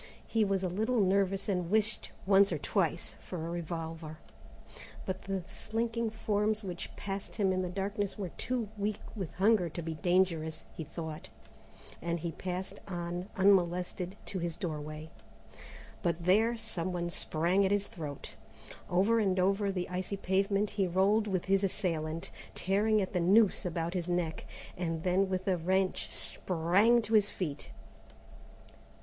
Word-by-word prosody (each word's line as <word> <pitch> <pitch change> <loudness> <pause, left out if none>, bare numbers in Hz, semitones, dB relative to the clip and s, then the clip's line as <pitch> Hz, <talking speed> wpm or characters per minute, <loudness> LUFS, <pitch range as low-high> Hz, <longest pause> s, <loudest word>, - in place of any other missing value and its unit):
He 225 -1 +2
was 195 -2 +1
a - - +2
little 220 +7 +1
nervous 195 0 +2
and 180 -4 0
wished 215 +2 +1 0.2
once 195 +1 +6
or - - 0
twice - - 0
for - - -7
a 165 - -4
revolver, 165 -2 -5 0.9
but 190 0 -3
the 195 -2 -2
slinking 230 +1 -2
forms 215 0 0
which 180 -2 -5
passed 195 0 -5
him 195 -3 +2
in 185 - +1
the 180 - -2
darkness 200 +2 -2
were 195 -4 -3
too 245 +4 -2
weak 205 0 0 0.2
with 190 -7 -4
hunger 195 -2 +3
to 170 - -5
be 165 0 -3
dangerous, 165 -2 +1
he 160 - -4
thought, 160 0 -6 0.7
and 170 +1 -1
he 170 - -2
passed 185 +2 -4
on 175 0 -4
unmolested 180 -1 +2
to 190 - -3
his 170 -1 -2
doorway. 155 -2 -5 0.9
But 170 -1 -1
there 220 +6 +4
somebody 175 -4 -2
sprang 175 +3 +1
at 190 - +3
his 205 0 +2
throat. 150 -7 -7 0.6
Over 195 +6 +4
and 190 -3 +2
over 195 +2 +2
the 180 -2 -2
icy 185 +2 -3
pavement 195 +2 +1
he 200 -2 +1
rolled 200 +5 +3
with 185 -3 -1
his 195 +1 +3
assailant, 165 -5 -1 0.2
tearing 205 +3 +2
at 190 - -5
the 180 - +2
noose 195 +2 +4
about 170 0 -2
his 180 -2 -2
neck, 175 -2 -1 0.3
and 165 -2 -2
then 190 +1 +2
with 185 0 -2
a 185 -2 +3
wrench 185 +3 +1
sprang 195 +8 +2
to 220 - -3
his 205 -2 +5
feet. 150 -6 -4
185 Hz, 155 wpm, -32 LUFS, 170-200 Hz, 0.9 s, once